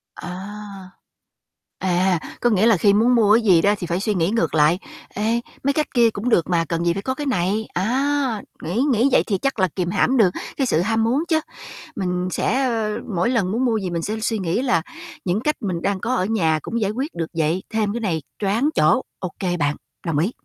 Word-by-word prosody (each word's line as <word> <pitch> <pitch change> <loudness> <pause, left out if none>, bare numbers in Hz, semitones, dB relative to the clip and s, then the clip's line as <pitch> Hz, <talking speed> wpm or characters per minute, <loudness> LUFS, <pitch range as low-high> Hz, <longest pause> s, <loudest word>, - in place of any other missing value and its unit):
À. 195 +1 -8 0.9
À, 180 -1 +2 0.2
có 240 - +3
nghĩa 210 -1 +3
là 230 -4 +5
khi 200 +4 +4
muốn 235 +4 +4
mua 215 -3 +5
cái 235 - +2
gì 180 -6 +5
đó 205 +3 +4
thì 175 - -5
phải 170 +2 -1
suy 210 +2 0
nghĩ 175 -2 +1
ngược 230 -6 0
lại. 155 +4 +4 0.3
Ê, 225 +3 -1 0.2
mấy 280 +1 +2
cách 305 +1 0
kia 235 -3 +5
cũng 220 +3 -3
được 175 -8 +2
mà, 170 -2 +2
cần 170 0 -1
gì 170 - +3
phải 195 - -4
có 260 +5 -2
cái 295 - -4
này, 215 -3 0
á, 260 +3 0 0.2
nghĩ 180 +10 -1
nghĩ 245 +3 +3
vậy - - +4
thì 200 - +1
chắc 275 +1 -2
là 185 - +4
kìm 180 -2 -1
hãm 260 +7 +2
được 210 -6 +5 0.3
cái 270 - +1
sự 160 -7 +2
ham 225 +4 +1
muốn 250 +7 +1
chớ. 320 -2 +2 0.6
Mình 180 -2 -1
sẽ, 260 +8 0
ờ, 220 -3 -1 0.2
mỗi 180 +8 +2
lần 200 -7 +1
muốn 240 +4 0
mua 235 -3 +2
gì 190 -4 -2
mình 170 -1 -2
sẽ 215 +5 -3
suy 225 0 -1
nghĩ 185 +5 -1
là 205 -11 +2 0.4
những 185 +3 0
cách 300 +5 0
mình 180 -5 -3
đang 200 -1 -1
có 245 +5 -1
ở 185 - +1
nhà 165 -8 +1
cũng 235 - -3
giải 205 -2 +1
quyết 265 +9 -4
được 165 -1 -3
vậy, 160 +4 +1
thêm 215 -2 0
cái 235 - -3
này 170 -8 -1 0.2
choáng 215 +8 +1
chỗ, 155 +12 +3 0.2
ô 185 - -3
kê 180 -2 -1
bạn, 145 -2 0 0.3
đồng 160 -3 0
ý. 175 +8 +1
205 Hz, 235 wpm, -21 LUFS, 180-235 Hz, 0.9 s, là